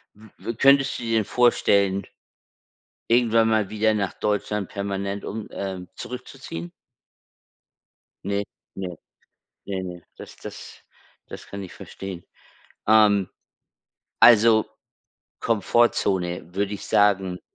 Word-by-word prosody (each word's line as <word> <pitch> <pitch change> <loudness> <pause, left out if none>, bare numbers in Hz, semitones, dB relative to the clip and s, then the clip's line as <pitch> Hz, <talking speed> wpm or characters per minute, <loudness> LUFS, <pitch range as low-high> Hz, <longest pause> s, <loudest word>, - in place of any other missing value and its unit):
w 110 +2 -16
w 115 - -4
könntest 135 +1 +4
du - - -7
dir 115 -1 0
denn 110 - +1
vorstellen, 100 -4 +3 1.1
irgendwann 115 -1 +4
mal 110 -3 +1
wieder 110 0 +2
nach 100 -3 -2
Deutschland 105 -1 -2
permanent 100 0 -3
um 110 0 -5
ähm, 95 -2 -5
zurückzuziehen? 125 -9 -8 1.5
Ne, 100 +1 0 0.3
ne, 90 -2 -5 0.7
ne, 95 -2 -3
ne. 90 -2 -7
Das - - -11
das - - -10 0.5
das - - -10
kann 100 0 -7
ich 95 - -9
verstehen. 95 -3 -8 0.6
Ähm, 105 -3 +5 0.9
also 110 -1 +7 0.7
Komfortzone 95 -6 +1
würde 100 +1 -1
ich 100 - -7
sagen, 95 -3 +2
100 Hz, 110 wpm, -24 LUFS, 95-110 Hz, 1.5 s, also